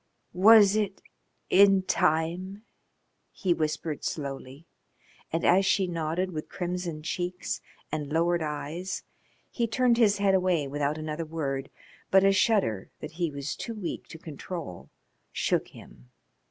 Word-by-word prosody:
"Was 205 +1 +7
it 200 -3 -1 0.5
in 195 0 +6
time?" 180 +4 0 0.7
he 180 -2 0
whispered 155 -1 -3
slowly, 140 0 -5 0.7
and 165 - -1
as 185 +3 +5
she 190 0 +2
nodded 170 +2 -2
with 155 -2 -6
crimson 175 -3 -4
cheeks 180 +3 -3 0.3
and 150 -2 -3
lowered 170 +2 +2
eyes 155 +4 -4 0.5
he 235 -2 0
turned 240 0 +2
his 210 -3 +4
head 200 -1 +2
away 180 -6 +2
without 145 +2 -1
another 155 +1 -4
word, 140 -4 -3 0.4
but 190 0 +5
a 195 - +5
shudder 195 - +1
that 155 - -7
he 170 +1 -1
was 140 -1 -5
too 230 - -6
weak 195 -6 -5
to - - -10
control 160 - -7 0.4
shook - - 0
him. 60 +1 -15
170 Hz, 135 wpm, -28 LUFS, 155-190 Hz, 0.7 s, Was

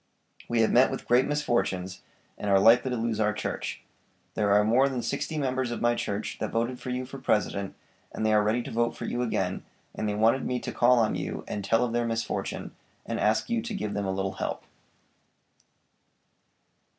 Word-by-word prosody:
We 120 -1 +2
have 110 - +3
met 125 +2 +5
with - - -6
great 125 +2 +4
misfortunes, 120 -10 -1 0.3
and 105 - -4
are 100 -1 +5
likely 120 +5 +5
to 125 - -1
lose 115 -1 -1
our 105 -1 +2
church. 105 - -4 0.5
There 105 -1 +1
are 105 +1 +5
more 125 +6 +4
than 125 -3 -3
sixty 155 - -2
members 130 -3 -1
of 120 - -3
my 120 0 +3
church 105 -3 -3
that - - -2
voted 120 +2 -1
for - - -6
you 125 +1 -2
for 135 +2 -9
President, 100 -4 0 0.4
and 110 - -3
they 110 - +3
are 105 - +5
ready 110 +3 +1
to - - -7
vote 115 +1 0
for - - -5
you 120 - -2
again, 95 -6 -1 0.3
and 110 - -2
they 105 - -1
wanted 115 +5 +3
me 125 - -1
to - - -4
call 125 +1 +4
on 110 -2 +2
you - - -4
and 100 - -4
tell 115 +4 +2
you - - +3
of 115 - -4
their 120 0 +1
misfortune, 115 0 -3 0.3
and - - -3
ask 110 +1 +2
you 235 -1 0
to 225 -1 -5
give 105 - -3
them 100 -1 -2
a - - 0
little 95 0 -1
help.'" - - -4
115 Hz, 210 wpm, -27 LUFS, 105-125 Hz, 0.5 s, met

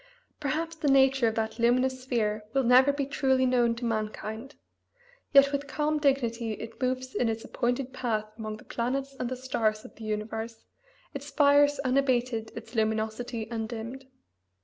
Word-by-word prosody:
Perhaps 320 +3 -2
the 305 - -2
nature 270 -2 +5
of 220 - -1
that 220 +1 -2
luminous 255 +2 +2
sphere 220 -4 -1
will 270 - +3
never 255 +3 +6
be 280 -1 -2
truly 265 -1 +2
known 240 -2 +3
to 240 +1 -5
mankind; 220 +3 -4 0.8
yet 280 0 +7
with 285 0 -2
calm 300 +1 0
dignity 240 -6 +1
it 225 +5 -9
moves 255 0 -1
in 240 - +1
its 225 +1 -3
appointed 245 +1 -2
path 225 -5 -1
among 215 -1 -5
the 245 - -15
planets 270 +3 -2
and 245 - -2
the 255 - -3
stars 220 -4 -1
of - - -12
the 225 - -10
universe, 220 +1 -4 0.5
its 280 +1 -6
fires 290 0 +4
unabated, 250 -4 +1
its 230 +1 -9
luminosity 220 +1 -1
undimmed. 230 +3 -5
245 Hz, 160 wpm, -28 LUFS, 225-270 Hz, 0.8 s, yet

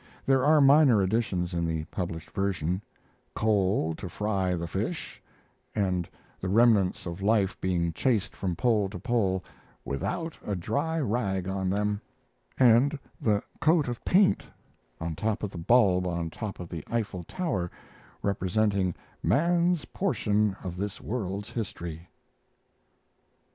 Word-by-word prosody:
There 135 -1 +3
are 150 +2 +5
minor 140 -4 +6
additions 95 -4 0
in 85 -1 0
the 80 -1 -1
published 85 -3 -4
version: 95 -2 -1 0.5
"coal 100 -6 +2
to 95 - -6
fry 95 -1 0
the 85 -1 -3
fish"; 85 - -4 0.5
and 90 -4 0 0.3
the 95 - -3
remnants 105 -3 +4
of 85 +1 -5
life 100 -2 +2
being 85 -3 0
chased 105 -2 0
from 90 -3 -2
pole 105 -2 +2
to 100 - -7
pole 100 -7 0 0.4
"without 105 - -3
a 105 - -2
dry 150 - -1
rag 100 - -1
on 95 -1 -1
them,"; 105 +1 0 0.6
and 130 +4 +5 0.2
the 105 -2 +2 0.2
"coat 155 -1 +3
of 120 -2 -4
paint" 190 +1 +4 0.6
on 80 -1 -3
top 110 +6 -1
of 100 - -2
the 85 - -7
bulb 90 -2 +4
on 85 -2 -2
top 105 +3 -5
the 80 -3 -6
Eiffel 105 -6 -2
Tower 100 - -2 0.5
representing 100 -1 +1 0.3
"man's 170 +2 +2
portion 105 - 0
of 90 -2 -5
this 100 +1 -4
world's 100 -3 -4
history." 85 -6 -5
100 Hz, 135 wpm, -28 LUFS, 90-120 Hz, 0.6 s, minor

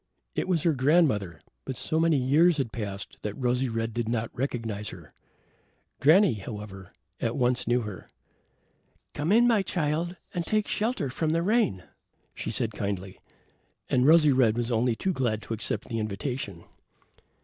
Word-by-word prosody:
It - - -2
was 175 -5 +1
her 165 - +3
grandmother, 130 - +2 0.2
but 130 - -5
so 160 - 0
many 165 -2 +3
years 150 +6 +4
had 130 -6 -1
passed 100 -3 -5
that 105 -1 -4
Rosy 125 +1 0
red 115 0 -2
did 120 -1 -2
not 115 -1 -2
recognize 115 -5 -3
her. 85 -4 -12 0.9
Granny, 165 - +5
however, 105 -3 -8 0.3
at 115 0 -1
once 125 -2 +1
knew 120 +1 +2
her. 105 -5 -8 1.0
"Come 150 +5 -1
in, 235 +3 +6
my 225 -4 +4
child, 170 -1 -1 0.2
and 175 - -1
take 215 +4 0
shelter 215 - -1
from 155 +3 -1
the 165 +1 +1
rain," 205 - +1 0.5
she - - -5
said 115 0 0
kindly, 100 -2 -4 0.7
and 125 +1 +3
Rosy 155 -2 +6
red 120 -4 +3
was 120 0 -1
only 115 +1 +2
too 190 +10 -1
glad 120 -7 0
to - - -5
accept 110 - -2
the 115 -2 -3
invitation. 105 -3 -4
125 Hz, 160 wpm, -27 LUFS, 110-160 Hz, 1.0 s, in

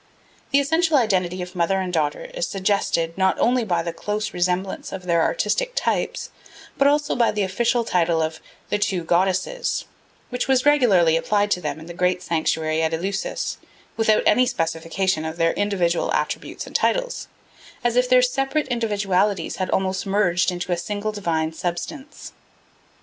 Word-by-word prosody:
The 280 - +4
essential 320 +2 +2
identity 185 -6 +1
of 180 +1 -10
mother 180 +2 +1
and 185 -1 -3
daughter 150 -3 0
is - - -2
suggested, 190 -4 0
not 190 0 +3
only 245 +1 +2
by 175 -5 0
the 170 0 -4
close 210 +4 -3
resemblance 180 +2 -1
of 190 -1 -6
their 170 -2 +2
artistic - - 0
types, - - -1 0.4
but 275 - +3
also 295 +1 +2
by 235 -2 +3
the 210 -1 0
official 235 +5 +1
title 170 -6 +1
of 160 0 -2 0.3
"the 205 - +1
Two 190 -4 0
Goddesses" 190 - 0 0.4
which 250 -1 -2
was 265 -1 +2
regularly 200 - +4
applied 205 +4 +1
to 180 - +1
them 155 0 -3
in 160 - -10
the 170 - -8
great 180 +1 0
sanctuary 160 -1 0
at 160 0 +1
Eleusis 195 +4 -3 0.4
without 220 -1 +3
any 255 0 +4
specification 165 -1 -1
of 160 +1 -5
their 165 -1 +2
individual 185 -5 0
attributes - - -3
and - - -13
titles, - - 0 0.6
as 240 -1 +1
if 250 0 +3
their 255 0 +6
separate 270 +4 0
individualities 205 -5 0
had 185 - -2
almost 190 0 -1
merged 180 -3 +2
in 175 - -5
a 175 -1 0
single 205 +4 -3
divine 165 -6 -1
substance. 185 - -5
190 Hz, 165 wpm, -22 LUFS, 170-235 Hz, 0.6 s, their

